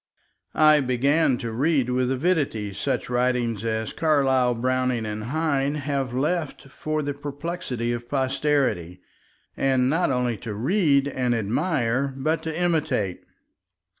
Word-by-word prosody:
I 155 -1 +6
began 135 +2 +2
to 115 -1 -5
read 135 +1 +1
with 125 0 +1
avidity 135 - 0
such - - -2
writing 125 -3 0
as 110 -1 -2
Carlyle, 135 -6 +2
Browning, 125 -1 0
and 105 0 -4
Heine 145 0 0
have 140 -3 -2
left 150 +2 -2
for 155 +2 -3
the 145 0 -2
perplexity 145 -4 -4
of 120 0 -5
posterity, 130 - 0 0.6
and 130 -1 +2
not 165 +3 +1
only 125 -3 0
to 110 -2 -6
read 140 - +2
and 125 -3 0
admire 130 - 0
but 155 +4 0
to 160 +1 -4
imitate. 155 - 0
130 Hz, 130 wpm, -24 LUFS, 120-150 Hz, 0.6 s, I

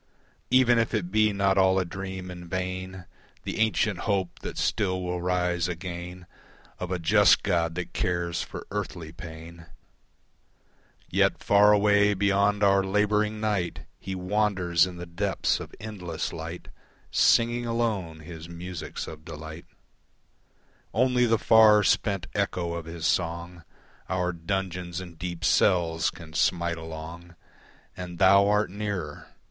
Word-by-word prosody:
Even 125 -2 +5
if 115 0 0
it 90 -4 -2
be 110 0 +3
not 100 -1 +2
all 95 0 +4
a 95 - +1
dream 95 +1 -6
in 90 -1 -9
vain 95 0 -4 0.4
The - - -4
ancient 110 -3 +1
hope 95 -4 -1
that - - -7
still 95 -4 0
will 90 0 -3
rise 90 -1 0
again 90 0 -6 0.5
Of 90 - -4
a 90 - -1
just 100 +5 +4
God 85 -4 0
that 90 - -5
cares 85 -1 -1
for - - -7
earthly 95 -6 -4
pain, 85 0 -10 1.4
Yet - - +1
far 100 +1 +6
away 105 0 +4
beyond 100 +1 +2
our 100 -1 +4
labouring 105 +2 +1
night, 105 -5 -1 0.2
He 95 0 -5
wanders 90 -3 +1
in 90 -1 -8
the 85 - -6
depths 85 0 -1
of - - -8
endless 100 -4 -5
light, - - -7 0.4
Singing 120 +1 +3
alone 105 -9 -2
his 80 +1 -10
musics 85 0 -6
of 80 -1 -10
delight; 80 0 -9 1.3
Only 125 +1 +3
the 115 0 +3
far, 110 -2 +6
spent 100 -4 +1
echo 90 -4 -1
of 85 -1 -5
his 85 0 -6
song 85 0 -1 0.5
Our 90 -1 0
dungeons 90 0 -3
and 85 -3 -10
deep 90 0 -4
cells 85 -6 +3
can 80 -3 -12
smite 85 0 +1
along, 80 +2 -9 0.6
And 90 -1 -7
Thou 100 +1 +6
art 105 -1 +2
nearer. 100 -1 -4
90 Hz, 140 wpm, -27 LUFS, 85-105 Hz, 1.4 s, far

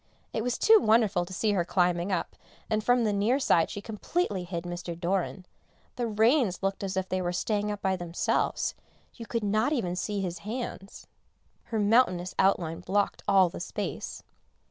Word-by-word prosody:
It 225 - -1
was 245 +1 -1
too 445 0 +6
wonderful 215 -5 +3
to 180 - -13
see 210 +3 0
her 190 -4 +1
climbing 175 +1 +1
up, 180 - -2 0.4
and 215 0 +1
from 245 +1 +3
the 210 -2 +1
near 210 +6 +2
side 175 -11 +3
she 205 - -6
completely 210 - -2
hid 170 -1 -4
Mr. 175 -1 -6
Doran; 185 +1 -1 0.5
the 240 -1 -1
reins 220 - +2
looked 195 +1 -1
as 190 -1 -3
if 190 0 -1
they 185 0 -1
were 175 -1 -1
staying 210 +3 -1
up 205 -1 -6
by 190 0 +2
themselves, 175 -1 -1 0.4
you 230 - -10
could 230 -2 -2
not 215 +5 +2
see 305 - +2 0.4
even 195 -1 -1
his 175 -1 -4
hands, 210 -3 -6 0.6
her 225 - -3
mountainous 205 -4 +3
outline 175 -4 +2
blocked 195 +3 0
all 190 -2 +5
the - - -8
space. - - -5
200 Hz, 180 wpm, -28 LUFS, 180-220 Hz, 0.6 s, too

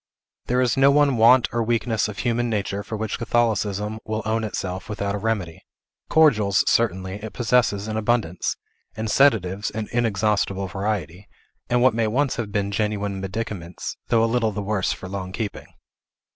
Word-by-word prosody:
There 125 +1 +2
is 125 -2 +2
no 135 +1 +6
one 140 -1 +4
want 120 +2 +6
or 120 - +1
weakness 115 -1 0
of 105 -1 -7
human 120 0 0
nature 100 -2 -2
for 110 +2 -6
which 110 0 -3
Catholicism 110 -3 0
will 110 0 -3
own 110 +1 0
itself 95 -2 -4
without 100 -1 -2
a 105 - -2
remedy; 100 -7 -2 0.5
cordials, 110 -11 +4
certainly, 95 -3 0
it 110 - -6
possesses 115 -4 +1
in 110 0 -3
abundance, 110 -6 0 0.4
and 110 -1 -2
sedatives 105 -8 +3
in 110 -1 -4
inexhaustible 105 -4 0
variety, 95 -1 -3 0.4
and 125 0 +2
what 130 -2 +5
may 115 -1 +1
once 130 +5 0
have 110 -4 -3
been 100 -1 -1
genuine 105 -2 -2
medicaments, 95 -3 -5
though 115 -1 +3
a - - +4
little 115 -1 +1
the 105 0 -4
worse 100 -2 0
for 95 - -6
long 95 -1 -5
keeping. 105 +1 -5
110 Hz, 170 wpm, -23 LUFS, 100-115 Hz, 0.5 s, no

